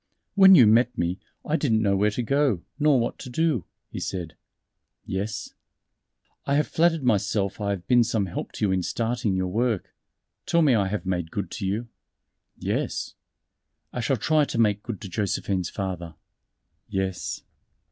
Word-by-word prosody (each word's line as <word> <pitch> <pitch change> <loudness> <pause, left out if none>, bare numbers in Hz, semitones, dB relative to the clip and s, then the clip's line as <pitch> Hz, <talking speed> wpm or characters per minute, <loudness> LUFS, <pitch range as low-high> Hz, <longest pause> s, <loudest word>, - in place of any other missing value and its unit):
"When 190 -1 +8
you 130 -8 +8
met 115 +3 +4
me, 85 +2 -1 0.3
I 155 - +1
didn't 115 -8 +1
know 100 -2 +2
where 105 +2 +3
to 115 +4 -3
go, 135 -7 +1 0.2
nor 145 -3 +4
what 115 - -2
to 130 - -8
do," 145 - 0 0.3
he - - -5
said. 85 -4 -4 0.7
"Yes." 100 +2 -4 0.9
"I 140 - +2
have 150 +1 +3
flattered 165 -2 +2
myself 100 -3 0
I 100 - -1
have 95 -4 -3
been 120 -1 +5
some 110 -3 0
help 90 - -5
to - - -1
you 100 - +1
in 95 -1 +1
starting 115 +1 -1
your 95 0 -1
work. 115 0 -1 0.5
Tell 170 -3 +3
me 140 -4 +5
have 100 -4 +1
I - - -8
made 90 -3 -1
good 95 0 -4
to 95 - -3
you?" 110 +5 -2 0.7
"Yes." - - -2 0.8
"I - - -3
shall 130 +2 +1
try 155 +7 +3
to 140 - -3
make 105 -3 +2
good 110 -3 -6
to 105 - -6
Josephine's 95 -2 -1
father." 90 -4 -5 0.7
"Yes." 95 -1 -3
110 Hz, 170 wpm, -25 LUFS, 95-125 Hz, 0.9 s, When